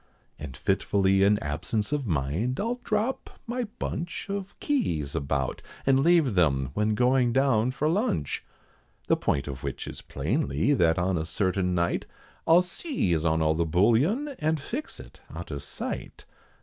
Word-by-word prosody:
And 70 -5 -7
fitfully 95 -1 +2
in 100 +1 +5
absence 85 - -2
of 145 -4 -1
mind, 85 - -1
I'll 235 +3 -1
drop 220 +4 -2
my 245 +1 -2
bunch 175 +4 -4
Of 200 -1 -5
keys 80 - 0
about, 70 -1 -1 0.2
and 135 0 +4
leave 160 -4 +4
them 70 -7 +2
when 105 +3 +1
going 125 0 +3
down 130 -3 +3
for 135 +4 -1
lunch. 165 - 0 0.6
The - - +3
point 70 0 -1
of 70 -2 -6
which - - -4
is - - -7
plainly, 130 - 0
that 85 -10 +3
on 90 -1 +1
a 80 - -2
certain 95 0 0
night, 85 0 0 0.4
I'll 170 +2 +6
seize 180 - -1
on 80 -1 +2
all 80 0 +3
the 85 +2 +1
Bullion, 120 - +2
and 155 0 +1
fix 250 - -5
it - - -13
out - - -7
of - - -4
sight. - - -6
110 Hz, 160 wpm, -27 LUFS, -, 0.6 s, I'll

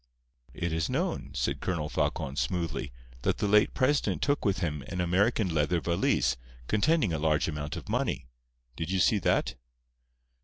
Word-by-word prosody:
"It 85 -2 -2
is 80 0 0
known," - - -1
said - - -1
Colonel 80 -4 -1
Falcon, 70 -2 -1
smoothly, 85 -4 -2 0.3
"that - - +1
the 105 - 0
late 105 +1 +4
President 140 +2 +1
took 145 0 +1
with 100 -1 +1
him 75 -6 -2
an 90 - -4
American 95 +2 +2
leather 80 +3 +2
valise, 85 -7 +1 0.3
containing 110 - +2
a 80 - -1
large 75 0 +2
amount 75 -1 -4
of - - -8
money. - - -1 0.5
Did 80 +2 -4
you 95 0 +1
see 105 +3 +4
that?" - - +1
85 Hz, 160 wpm, -29 LUFS, 75-105 Hz, 0.5 s, late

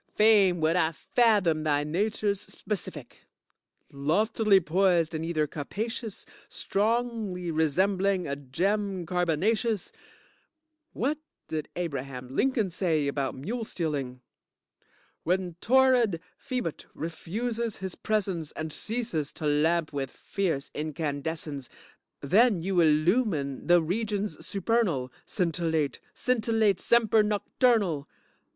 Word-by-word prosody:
Fain 205 -5 +5
would 160 +2 +3
I 165 -2 +2
fathom 200 -6 +2
thy 145 -1 +2
nature's 200 +5 0
specific. 165 - -6 0.7
Loftily 195 +8 +3
poised 175 -1 +2
in 160 0 -2
ether 165 -2 0
capacious, 215 - -5 0.2
strongly 215 -4 -1
resembling 185 +4 +1
a 140 - -2
gem 185 +7 -1
carbonacious. 185 +6 0 1.0
What 285 +5 -1 0.3
did 155 -1 -3
Abraham 135 -6 -5
Lincoln 240 -8 +1
say 160 -5 0
about 140 -1 -1
mule 225 - -4
stealing? 145 - -3 1.0
When 180 0 0
torrid 250 -7 +4 0.2
Phoebut 250 - -4
refuses 220 +8 -3
his 190 -2 -5
presence 190 -7 -2
and 155 -1 -4
ceases 220 -10 -3
to 155 - -6
lamp 155 +2 +2
with 135 -2 -2
fierce 165 -6 -3
incandescence, 150 -2 -3 0.5
then 195 - +4
you 190 -1 +1
illumine 155 - +2
the 175 -1 +5
regions 205 -1 -2
supernal, 180 - 0 0.2
scintillate, 165 -5 0 0.2
scintillate, 225 -5 +2
semper 225 -2 +4
noctornal. 210 - +1
180 Hz, 100 wpm, -28 LUFS, 155-215 Hz, 1.0 s, Fain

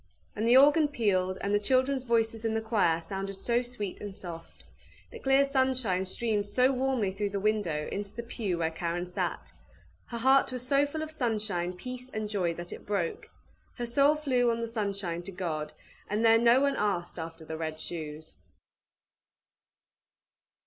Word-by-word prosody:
And 220 +2 0
the 245 +2 +7
organ 295 +3 +6
pealed, 190 -8 0
and 200 +1 -1
the 205 - +4
children's 260 +4 +1
voices 225 -1 +1
in 225 -1 0
the 225 - 0
choir 205 -7 +2
sounded 195 +3 -5
so 235 +5 +1
sweet 240 -6 -6
and 205 -2 -6
soft! 170 -4 -9 0.5
The 465 - -9
clear 270 -4 +4
sunshine 260 -9 +1
streamed 210 +1 -1
so 255 +5 +3
warmly 260 -6 0
through 200 +1 -2
the 200 0 -2
window 195 -8 0
into 200 0 -4
the 235 - -4
pew 210 -6 -3
where 165 -1 0
Karen 170 +2 -2
sat! 180 - -3 0.6
Her 235 - -5
heart 265 +3 +4
was 250 -1 -5
so 280 +2 +3
full 315 +2 -4
of 315 - -6
sunshine, 215 - -1
peace, 250 +6 -7
and 215 -3 -3
joy, 185 -5 -1
that 175 +1 -7
it - - -11
broke. 200 -5 -2 0.5
Her 240 - -2
soul 280 +5 +4
flew 255 -5 +2
on 230 0 0
the 230 - -2
sunshine 200 -6 -3
to 175 - -8
God, 165 -5 -3 0.4
and 215 +3 +1
there 225 0 +7
no 235 +3 +5
one 280 0 +2
asked 180 -4 -1
after 165 0 -7
the 160 - -5
RED 155 -1 -4
SHOES. 155 -2 -7
215 Hz, 175 wpm, -29 LUFS, 180-250 Hz, 0.6 s, the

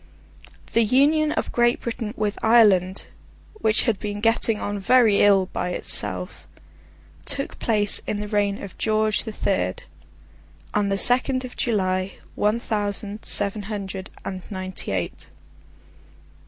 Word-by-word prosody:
The 230 - +4
Union 295 +7 +3
of - - -2
Great 240 0 +2
Britain 230 -1 -5
with 210 -1 -1
Ireland—which 215 - +1
had 230 -6 0
been 205 -1 -4
getting 225 0 +1
on 205 0 -3
very 225 0 +4
ill 200 -2 +5
by 180 0 -2
itself—took 275 +8 -5
place 210 -3 +1
in 205 - -2
the 210 - -4
reign 205 -1 -1
of 200 - -10
George 215 0 +1
the 220 - -4
Third, - - -2 0.9
on 205 -2 +1
the 195 - 0
second 255 +4 +2
of 250 - -10
July, 185 -4 -1 0.2
one 210 +3 +1
thousand 205 -1 -3
seven 205 +1 +3
hundred 195 -2 -6 0.2
and 190 -1 -5
ninety 185 -2 -3
eight. 95 -3 -4
210 Hz, 125 wpm, -23 LUFS, 200-230 Hz, 0.9 s, ill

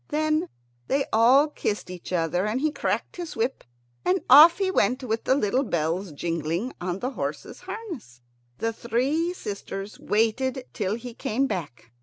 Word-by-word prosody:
Then 310 +3 0 0.4
they 275 0 +1
all 250 +7 +6
kissed 210 -9 -3
each 180 0 -9
other, 175 +2 0
and 220 +4 0
he 305 +2 +1
cracked - - -2
his 345 -2 -6
whip, 235 +4 -1 0.4
and 375 +1 +2
off 315 +5 +10
he 385 -1 +1
went, 255 - +1
with 225 -2 -2
the 260 - +4
little 250 0 +1
bells 175 - -1
jingling 165 - -2
on 180 0 -2
the 250 +6 -3
horses' - - -5
harness. 330 - -7 0.4
The 225 +6 -1
three 265 +10 0
sisters 200 - -6
waited 250 +5 0
till 205 -1 -1
he 240 +1 -8
came 240 +3 -1
back. 145 - -5
230 Hz, 160 wpm, -25 LUFS, 190-280 Hz, 0.4 s, off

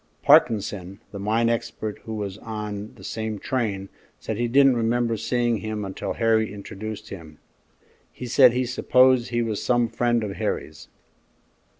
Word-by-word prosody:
Parkinson, 100 -3 +3
the 100 - -7
mine 110 +3 +1
expert 115 -2 -3
who 110 - -5
was 100 -1 -5
on 105 0 -6
the 95 - -15
same 110 +1 -4
train, 100 -5 -2 0.3
said 110 - -4
he 120 +1 0
didn't 135 +1 +5
remember 115 0 +1
seeing 120 +1 0
him 105 0 -4
until 95 - -4
Harry 110 -2 +1
introduced 105 +1 -7
him; 80 -5 -10 0.7
he 125 - -8
said 125 +1 +6
he 125 +1 0
supposed 130 0 +3
he 120 -1 0
was 110 -3 -3
some 120 -1 +2
friend 120 0 0
of 100 -2 -5
Harry's. - - -4
110 Hz, 155 wpm, -24 LUFS, 105-120 Hz, 0.7 s, said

